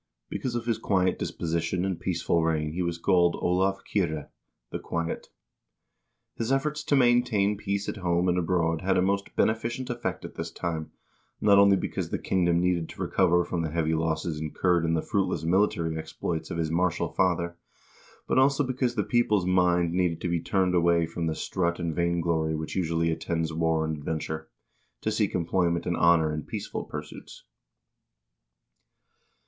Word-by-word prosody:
l - - -55 0.3
Because 125 -2 -3
of 120 -1 -2
his 115 -2 0
quiet 95 -2 +1
disposition 85 +2 -2
and 95 -3 -2
peaceful 85 -1 0
reign 80 -2 0
he 90 +3 -3
was 85 -1 -1
called 85 -1 +3
Olav 95 +2 0
Kyrre 80 -7 -1 0.4
(the - - -3
quiet). 85 0 -3 1.1
His 115 +2 -3
efforts 150 +3 0
to 145 - +2
maintain 120 -5 +3
peace 100 0 -3
at - - -3
home 90 -1 +1
and 90 - +2
abroad 85 -2 +1
had 95 0 +1
a - - +4
most 100 +1 -1
beneficent 120 +3 0
effect 120 -1 -4
at - - -8
this 80 0 -5
time, 80 -2 -4 0.5
not 100 -1 +5
only 100 0 +6
because - - -3
the - - -1
kingdom 85 -2 +1
needed 90 -2 0
to - - -11
recover 90 -2 +3
from 85 -1 -2
the 80 - -2
heavy 80 0 0
losses 80 -1 -1
incurred 85 +2 +1
in 80 0 +1
the 80 - -1
fruitless 95 -5 -1
military 85 -2 +1
exploits 80 +1 -4
of - - -4
his 80 -1 -1
martial 90 +1 +1
father, 85 -2 +1 0.7
but - - +3
also 140 +2 +4
because 130 -2 -1
the 105 - +1
people's 105 -6 +2
mind 90 -2 +2
needed 90 -2 +1
to 90 - -1
be 85 -1 +1
turned 95 +1 +1
away 85 -1 +3
from 85 0 -3
the 80 - -1
strut 85 -2 -1
and 85 -2 -2
vainglory 85 -2 0
which 80 0 -5
usually 85 -2 +1
attends 80 0 -2
war 80 0 +1
and 80 -1 -2
adventure, 80 +1 -4 0.5
to - - -1
seek - - 0
employment 85 0 0
and 85 - 0
honor 85 -2 +4
in 75 - -3
peaceful - - -5
pursuits. - - -9
85 Hz, 175 wpm, -27 LUFS, 80-95 Hz, 1.1 s, only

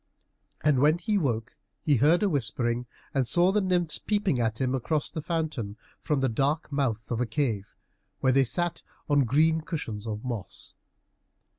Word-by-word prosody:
And 150 -4 +3
when 150 +4 +4
he 205 +4 0
woke 120 - -2 0.3
he 145 -4 +3
heard 160 - +4
a - - +4
whispering, 120 - -1 0.3
and 135 -3 +1
saw 175 +7 +4
the 210 +1 +2
nymphs 175 -4 +1
peeping 205 - 0
at 110 -1 0
him 130 -1 +1
across 145 +4 -1
the 160 - -4
fountain 150 - -3 0.2
from 145 -3 0
the 135 - +3
dark 140 +7 0
mouth 125 -6 -1
of 120 0 0
a 125 - 0
cave, 110 -5 -2 0.4
where 130 - +3
they 135 +1 +5
sat 175 +6 -1 0.3
on 145 -3 +3
green 160 +6 +3
cushions 115 - -5
of 110 +2 -4
moss. 120 -6 -5
140 Hz, 170 wpm, -27 LUFS, 120-160 Hz, 0.4 s, they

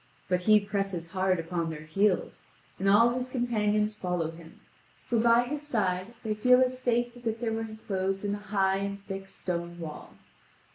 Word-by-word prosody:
But 180 -1 +1
he 215 +3 +6
presses 195 -4 -3
hard 185 0 +1
upon 165 0 -2
their 155 -1 -6
heels, 195 +5 0 0.4
and 195 +1 +2
all 225 +4 +6
his 250 +1 -3
companions 215 -4 +1
follow 180 -5 -2
him, 165 0 -14 0.4
for 235 - 0
by 235 +1 +5
his 290 +4 -4
side 205 -6 -1
they 215 -2 0
feel 250 +4 +5
as 255 0 +1
safe 240 0 +1
as 240 -1 -7
if 225 0 -1
they 230 -2 -1
were 225 0 -2
enclosed 195 -3 -3
in 205 - 0
a 205 - -3
high 195 -2 +1
and 200 0 -4
thick 195 0 -6
stone 175 -2 -4
wall. 160 -3 -8
200 Hz, 185 wpm, -29 LUFS, 185-230 Hz, 0.4 s, he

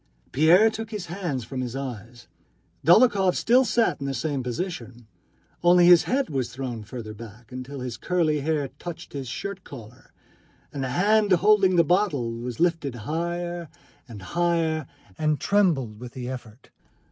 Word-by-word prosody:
Pierre 170 - +5
took 225 0 -6
his 210 -5 -5
hands 170 -7 -4
from 130 +3 -5
his 125 0 -4
eyes. 120 -3 -7 0.6
Dólokhov 195 0 +5
still 250 +3 +4
sat 230 -4 +1
in 140 - -3
the 135 - -2
same 140 +2 -2
position, 125 -3 -5 0.6
only 175 0 +6
his 175 -1 +7
head 270 +1 0
was 130 -5 -3
thrown 125 -3 -5
further 110 0 -8
back 115 +2 -12
till 135 +1 -8
his 125 -2 -5
curly 165 -3 0
hair 145 -2 -1
touched 175 -2 -8
his 135 -2 -5
shirt 195 +9 -5
collar, 120 -2 -12 0.6
and 140 - -3
the 130 - -2
hand 205 +7 +2
holding 195 0 +4
the 170 - +5
bottle 170 - +1
was 120 0 -6
lifted 165 -7 0
higher 170 +1 -3 0.4
and 105 -5 -10
higher 165 -4 0 0.3
and 155 -1 +1
trembled 155 - +1
with 120 0 -9
the 125 -2 -6
effort. 125 -2 -9
150 Hz, 160 wpm, -25 LUFS, 125-180 Hz, 0.6 s, his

